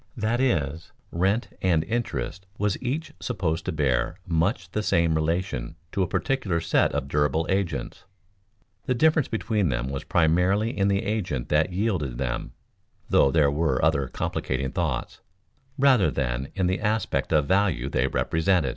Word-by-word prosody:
That 115 +2 0
is, 80 - 0 0.2
rent 95 +7 +1
and 85 -4 +2
interest 95 - -3
was 105 -1 +1
each 140 +6 -3
supposed 85 -10 -2
to - - -1
bear 70 0 0
much 85 +7 0
the 105 - -1
same 85 -5 +2
relation 80 -5 -1 0.2
to 100 - -1
a 90 - +2
particular 95 -1 0
set 80 - +2
of 70 -1 -2
durable 75 +3 +1
agents; 85 -10 -2 0.8
the 125 - +1
difference 155 +2 +3
between 105 -3 0
them 65 0 -2
was 70 - -4
primarily 90 +7 +2
in 100 0 +2
the 100 0 +1
agent 95 - -2
that 80 +4 +2
yielded 90 - -1
them 65 -2 -3 0.6
(though - - +5
there 70 -1 +3
were 75 -4 +1
other 70 -4 +2
complicating 65 +1 -2
thoughts) 85 -8 -2 0.6
rather 130 -7 +5
than 65 -1 -2
in 95 - +1
the 95 +1 0
aspect 105 -1 -1
of 75 -3 +3
value 95 -8 +1
they 65 -1 +1
represented. 80 0 +1
85 Hz, 155 wpm, -25 LUFS, 70-100 Hz, 0.8 s, though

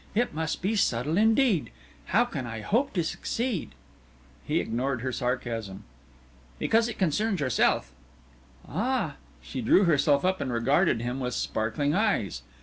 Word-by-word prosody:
It 240 +3 +1
must 160 +2 -3
be 210 +4 +1
subtle 145 - +1
indeed! 220 - +3 0.4
How 230 +6 +3
can 140 - -5
I 115 -1 -5
hope 235 - +1
to 175 - +1
succeed?" 225 - -3 0.7
He - - 0
ignored 125 +2 -2
her 130 +1 -2
sarcasm. 120 -6 -3 0.7
"Because 225 - +2
it 230 - -6
concerns 195 +3 +1
yourself." 130 -5 +1 0.8
"Ah!" 210 - -1 0.3
She 130 - -5
drew 180 - +5
herself 145 -3 +3
up 185 0 +1
and 130 - -2
regarded 120 +3 +2
him 125 +2 -3
with 125 -1 -2
sparkling 115 +7 -1
eyes. 185 - 0
150 Hz, 145 wpm, -27 LUFS, 125-205 Hz, 0.8 s, drew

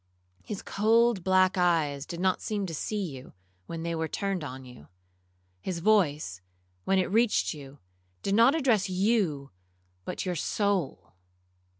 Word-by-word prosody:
His 205 - -6
cold 225 -1 +2
black 185 0 +3
eyes 155 -5 +1
did 170 0 -6
not 185 0 +1
seem 205 -2 -2
to 170 - -6
see 205 +6 -2
you, 130 -1 -11 0.3
when 165 -1 -5
they 170 0 -2
were 160 0 -1
turned 195 -1 -2
on 130 -2 -7
you. 125 -12 -14 0.7
His 180 - -3
voice, 155 - +1 0.4
when 195 - +2
it 185 0 0
reached 230 +1 +2
you, 140 -2 -11 0.5
did 195 - 0
not 235 +7 +5
address 235 -11 +2
you, 185 -8 0 0.5
but - - -4
your 180 - -1
soul. 165 - -1
185 Hz, 150 wpm, -28 LUFS, 150-205 Hz, 0.7 s, not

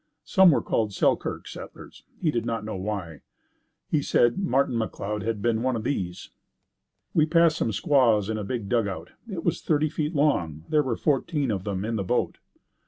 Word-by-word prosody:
Some 190 -2 +6
were 155 - +3
called 110 -3 0
Selkirk - - 0
settlers. - - -10 0.2
He 160 -4 +1
did 120 -5 -1
not 115 -2 -3
know 110 - -4
why. 95 -5 -4 0.7
He 150 - +1
said 120 -1 +2
Martin 140 -9 +1
McLeod 105 -2 -3
had 110 -1 -3
been 115 -1 +1
one 130 0 +1
of 110 - -3
these. 95 -9 -3 0.8
We 155 -1 +3
passed 165 -1 +4
some 115 - 0
squaws 115 -5 +3
in 110 0 -2
a - - -3
big 110 0 -3
dugout. 100 -7 -1 0.2
It 175 -5 -5
was 170 - 0
thirty 155 -1 +1
feet 155 +2 -3
long. 85 - +1
There 150 - +4
were 130 -5 -1
fourteen 145 -2 0
of 95 -3 -3
them 100 -1 -2
in 115 0 -1
the 100 - -1
boat. 90 - -1
115 Hz, 185 wpm, -26 LUFS, 105-150 Hz, 0.8 s, Some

